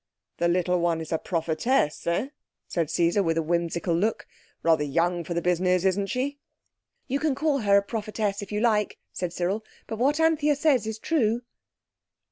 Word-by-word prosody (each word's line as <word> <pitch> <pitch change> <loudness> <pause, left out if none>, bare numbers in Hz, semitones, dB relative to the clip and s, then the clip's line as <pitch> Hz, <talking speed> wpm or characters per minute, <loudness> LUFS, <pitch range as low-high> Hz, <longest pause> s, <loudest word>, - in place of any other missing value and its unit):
"The 170 - +2
little 180 +1 +1
one 170 -1 +1
is 160 - -7
a 160 - +1
prophetess, 165 - 0
eh?" 185 +10 0 0.4
said 165 -4 -1
Caesar, 170 +4 +2
with 165 -3 0
a 165 - +1
whimsical 170 +1 0
look. 205 +7 0 0.4
"Rather 160 -2 +3
young 170 +4 0
for 170 +2 -4
the 170 - -1
business, 180 +1 +2
isn't 195 +1 +1
she?" 270 +5 -2 0.7
"You 275 +1 0
can 300 -3 +1
call 285 0 +1
her 200 -3 +4
a 200 - +3
prophetess 210 -1 -2
if 200 - -8
you 210 0 -1
like," 215 -3 +1 0.2
said 180 -2 -3
Cyril, 180 +5 -1 0.2
"but 220 - -6
what 285 +5 +2
Anthea 310 -2 +3
says 280 -7 +2
is 220 0 -3
true." 240 -4 0
195 Hz, 180 wpm, -26 LUFS, 170-240 Hz, 0.7 s, her